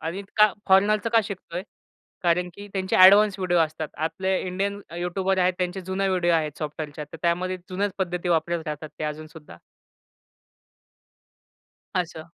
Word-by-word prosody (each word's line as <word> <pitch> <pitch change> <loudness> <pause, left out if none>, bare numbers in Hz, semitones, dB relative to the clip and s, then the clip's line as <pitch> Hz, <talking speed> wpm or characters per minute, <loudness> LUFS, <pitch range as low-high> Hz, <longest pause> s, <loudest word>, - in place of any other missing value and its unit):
आणि 170 +5 -4
का 210 -1 +6 0.2
फॉरेनरचं 210 +4 +4
का 230 -1 +5
शिकतोय? 185 -2 -6 0.6
कारण 175 +1 +2
की 205 +2 -10
त्यांचे 190 -1 -1
ॲडवान्स 200 +2 +7
व्हिडिओ 180 -2 +1
असतात. 155 -1 0
आपले 190 +4 -1
इंडियन 195 +2 -2
अ, 170 - -8
युट्यूबर 190 +2 -1
आहेत 180 0 +3
त्यांचे 180 +1 -2
जुने 190 +1 -1
व्हिडिओ 175 -2 +2
आहेत 155 -2 -1
सॉफ्टवेअरच्या. 150 0 -5
तर - - -7
त्यामध्ये 180 +2 0
जुन्याच 200 +2 -1
पद्धती 180 -1 -2
वापरत 170 0 +1
राहतात 150 0 -5
ते - - -3
अजून 155 +1 -4
सुद्धा. 155 - -13 2.4
असं. 165 -3 -2
180 Hz, 150 wpm, -25 LUFS, 160-190 Hz, 2.4 s, ॲडवान्स